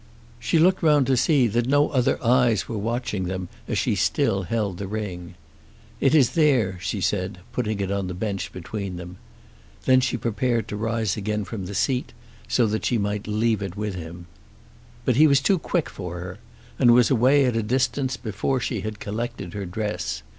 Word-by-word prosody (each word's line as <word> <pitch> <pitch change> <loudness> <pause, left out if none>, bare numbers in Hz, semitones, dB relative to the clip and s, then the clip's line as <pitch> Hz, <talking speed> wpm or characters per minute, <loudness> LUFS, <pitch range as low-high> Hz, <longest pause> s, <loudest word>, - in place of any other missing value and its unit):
She 165 - +1
looked 185 +4 +4
round 150 -4 +4
to 130 +1 +2
see 135 +1 +3
that 120 +2 0
no 145 +2 +3
other 130 -4 +1
eyes 120 -4 +3
were 115 - -4
watching 110 -3 -2
them 90 0 -4 0.2
as - - -1
she - - +1
still 95 - +1
held 100 -1 -2
the 100 - -4
ring. 95 -4 -5 0.6
"It 135 +3 +3
is 135 -6 +5
there," 125 - +2
she 90 +3 -3
said, 95 +1 -1
putting 110 -4 -2
it 100 -1 -2
on 100 -1 -1
the 90 - -5
bench 100 0 -3
between 95 +1 -5
them. 90 +1 -9 0.7
Then 130 0 +5
she 125 - 0
prepared 115 0 -1
to - - -4
rise 110 -1 -1 0.3
from 100 -2 -6
the 100 - -6
seat 130 +2 0 0.3
so 120 - +2
that 110 0 -1
she 120 - +2
might 105 0 -2
leave 110 0 +1
it 95 -1 -5
with 105 -1 -2
him. 85 0 -8 0.8
But 125 -2 +2
he 155 +2 +7
was 140 -2 +5
too 180 +7 +2
quick 170 0 -1
for 90 -2 -7
her, 90 +3 -7 0.4
and 120 -3 +6
was 125 +1 +4
away 135 +3 +4
at 125 -2 0
a 115 - +1
distance 130 +3 0
before 115 +4 -2
she - - -2
had 110 -1 -5
collected 105 -4 -5
her 100 -2 -4
dress. 105 +3 -3
110 Hz, 190 wpm, -24 LUFS, 95-125 Hz, 0.8 s, he